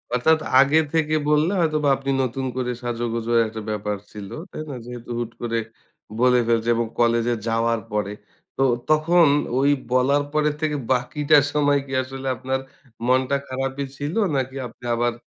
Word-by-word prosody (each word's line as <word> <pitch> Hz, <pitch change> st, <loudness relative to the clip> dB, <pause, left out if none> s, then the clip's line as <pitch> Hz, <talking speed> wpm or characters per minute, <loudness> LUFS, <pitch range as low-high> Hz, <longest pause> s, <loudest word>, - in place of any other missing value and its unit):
অর্থাৎ 160 Hz, +6 st, +3 dB, 0.2 s
আগে 140 Hz, +3 st, +5 dB, 0.2 s
থেকে 155 Hz, -1 st, +1 dB
বললে, 150 Hz, +4 st, +3 dB
হয়তোবা 155 Hz, -3 st, +2 dB
আপনি 135 Hz, 0 st, -6 dB
নতুন 130 Hz, +2 st, -3 dB
করে 125 Hz, -1 st, -1 dB
সাজো 120 Hz, -1 st, -3 dB
গোজো 115 Hz, 0 st, -2 dB, 0.2 s
একটা 110 Hz, 0 st, -7 dB
ব্যাপার 105 Hz, -1 st, -2 dB
ছিল। 100 Hz, -2 st, -8 dB, 0.2 s
তাই 155 Hz, -, -6 dB
না? 140 Hz, -, -5 dB
যেহেতু 120 Hz, -1 st, -9 dB
হুট 120 Hz, -1 st, -3 dB
করে 115 Hz, -1 st, -1 dB, 0.6 s
বলে 125 Hz, 0 st, +5 dB
ফেলছে 115 Hz, 0 st, +1 dB
এবং 115 Hz, -1 st, 0 dB
কলেজে 120 Hz, 0 st, +3 dB
যাওয়ার 115 Hz, 0 st, +1 dB
পরে। 105 Hz, -1 st, -1 dB, 0.5 s
তো -, -, -1 dB, 0.3 s
তখন 160 Hz, +2 st, +5 dB, 0.3 s
ওই 140 Hz, +1 st, +3 dB, 0.2 s
বলার 140 Hz, +3 st, +3 dB
পর 155 Hz, 0 st, +1 dB, 0.2 s
থেকে 155 Hz, -1 st, 0 dB, 0.2 s
বাকিটা 140 Hz, +4 st, +3 dB, 0.2 s
সময় 145 Hz, -1 st, +3 dB
কি 135 Hz, -, -12 dB
আসলে 135 Hz, +1 st, -7 dB
আপনার 130 Hz, +2 st, -2 dB, 0.5 s
মনটা 130 Hz, +2 st, +2 dB
খারাপই 135 Hz, +1 st, -3 dB
ছিল? 145 Hz, +4 st, -3 dB, 0.2 s
নাকি 130 Hz, 0 st, -2 dB
আপনি 115 Hz, -, -19 dB
আবার 120 Hz, 0 st, +1 dB
130 Hz, 160 wpm, -23 LUFS, 120-145 Hz, 0.6 s, আগে